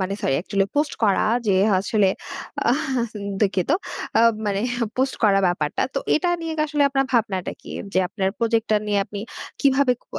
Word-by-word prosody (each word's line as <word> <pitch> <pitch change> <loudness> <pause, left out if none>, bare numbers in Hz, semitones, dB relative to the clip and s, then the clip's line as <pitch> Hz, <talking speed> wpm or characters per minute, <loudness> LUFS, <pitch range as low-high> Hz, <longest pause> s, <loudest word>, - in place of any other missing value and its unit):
মানে, 190 +1 -1
sorry, 135 - +1
actually 195 -1 0
post 295 0 +1
করা, 200 -3 +3 0.2
যে, 200 - +3 0.2
আসলে। 195 +1 +2 0.6
আহ, 260 -1 +1
সেন 210 - -7 0.2
দুঃখিত 195 -3 +1 0.5
আ - - +6 0.3
মানে 200 -1 0 0.4
পোস্ট 265 +1 +1
করা 200 -2 +5
ব্যাপারটা। 165 -4 0
তো - - +1 0.2
এটা 355 +3 +1
নিয়ে 330 -1 -3
কি - - -1
আসলে 295 -1 +1
আপনার 270 0 +1
ভাবনাটা 205 -6 0
কি? - - -11 0.2
যে, - - +2
আপনার 190 -1 -1
প্রজেক্টটা 225 -2 +1
নিয়ে 205 -1 +1
আপনি 200 0 -7 0.4
কিভাবে 275 -2 +4
ক - - -34
215 Hz, 175 wpm, -23 LUFS, 195-265 Hz, 0.6 s, আ